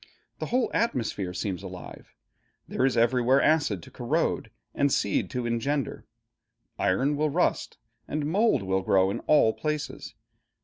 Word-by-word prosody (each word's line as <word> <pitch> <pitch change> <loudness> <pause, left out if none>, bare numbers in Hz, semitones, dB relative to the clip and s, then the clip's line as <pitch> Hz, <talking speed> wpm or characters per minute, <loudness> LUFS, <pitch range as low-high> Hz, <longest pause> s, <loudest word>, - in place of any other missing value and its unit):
The - - -3
whole 250 0 +1
atmosphere 115 - -1
seems 90 0 -3
alive. 95 -2 -10 0.5
There 130 - +1
is 125 - -1
everywhere 125 +3 +4
acid 145 - +2
to - - -13
corrode, - - -1 0.2
and 140 0 +1
seed 100 - +1
to 125 -2 -3
engender. 135 +5 -2 0.7
Iron 135 +11 +2
will 150 +1 +1
rust, 175 +5 0 0.3
and 150 -1 -2
mold 195 - +2
will 95 0 0
grow, 95 0 +3
in - - -3
all 130 -7 +5
places. 150 -1 -4
125 Hz, 140 wpm, -27 LUFS, 100-150 Hz, 0.7 s, all